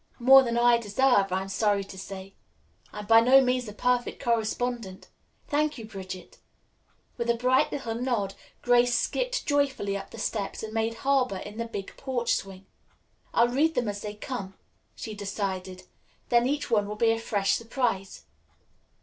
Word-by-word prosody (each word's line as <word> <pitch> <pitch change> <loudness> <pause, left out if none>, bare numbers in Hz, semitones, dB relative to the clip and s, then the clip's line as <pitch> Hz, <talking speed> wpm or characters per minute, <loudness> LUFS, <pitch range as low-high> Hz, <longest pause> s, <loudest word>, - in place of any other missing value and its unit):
"More 265 +2 +8
than 235 -2 -1
I 240 0 +5
deserve, 220 -2 +2
I 185 +1 0
am - - -8
sorry 200 0 +1
to 195 - -11
say. 190 0 -8 0.6
I'm 210 0 -7
by 225 +1 +7
no 255 +3 +7
means 250 -2 +1
a - - -6
perfect 245 +3 0
correspondent. 230 -3 -2 0.4
Thank 300 0 0
you, 225 - -7
Bridget." 185 -3 -9 0.8
With 235 0 -2
a 235 - +4
bright 255 +2 +2
little 240 -5 -3
nod, 230 -5 -1 0.3
Grace 245 -1 +4
skipped - - -1
joyfully 275 -9 0
up 195 0 -6
the - - -11
steps 205 -1 -3
and 220 0 -6
made 225 0 -1
harbor 260 -7 +2
in 210 +4 -8
the 230 - -1
big 200 -4 -7
porch 255 -3 -1
swing. 195 0 -5 0.7
"I'll 235 +1 +3
read 305 +6 +1
them 245 -2 0
as 205 0 -4
they 210 0 -6
come," 210 -4 -6 0.4
she 220 - -6
decided, 195 -2 -4 0.5
"then 240 0 +4
each 290 +2 -2
one 205 -3 +2
will 210 - -5
be 225 +1 +3
a 225 - 0
fresh 205 -3 0
surprise. 230 -5 -2
230 Hz, 170 wpm, -27 LUFS, 200-250 Hz, 0.8 s, More